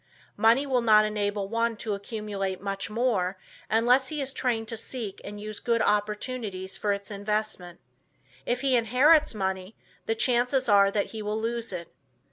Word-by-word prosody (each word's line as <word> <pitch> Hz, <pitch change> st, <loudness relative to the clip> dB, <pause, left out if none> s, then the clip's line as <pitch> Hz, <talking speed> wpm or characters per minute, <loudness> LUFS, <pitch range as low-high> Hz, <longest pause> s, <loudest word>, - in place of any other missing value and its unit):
Money 230 Hz, +6 st, +4 dB
will 260 Hz, -3 st, +1 dB
not 215 Hz, -2 st, +6 dB
enable 205 Hz, -1 st, -1 dB
one 230 Hz, +1 st, 0 dB
to 215 Hz, -1 st, -3 dB
accumulate 200 Hz, -2 st, -4 dB
much 195 Hz, 0 st, -4 dB
more, 210 Hz, -5 st, 0 dB, 0.3 s
unless 245 Hz, +4 st, +3 dB
he 300 Hz, +2 st, -4 dB
is 270 Hz, -1 st, -2 dB
trained 230 Hz, -3 st, -1 dB
to 230 Hz, -, -4 dB
seek 225 Hz, -3 st, -5 dB
and 205 Hz, 0 st, -7 dB
use 215 Hz, 0 st, -6 dB
good 235 Hz, -1 st, +1 dB
opportunities 210 Hz, -2 st, -1 dB
for 205 Hz, +1 st, -1 dB
its 200 Hz, 0 st, -4 dB
investment. 205 Hz, -4 st, -3 dB, 0.6 s
If 245 Hz, +1 st, -1 dB
he 270 Hz, -2 st, +3 dB
inherits 250 Hz, +5 st, +4 dB
money 190 Hz, 0 st, -3 dB, 0.3 s
the 225 Hz, -, +1 dB
chances 250 Hz, +3 st, +2 dB
are 200 Hz, -2 st, +6 dB
that 200 Hz, 0 st, -1 dB
he 220 Hz, -, -5 dB
will 210 Hz, +1 st, -2 dB
lose 230 Hz, 0 st, -2 dB
it. 175 Hz, -2 st, -7 dB
215 Hz, 165 wpm, -27 LUFS, 200-240 Hz, 0.6 s, not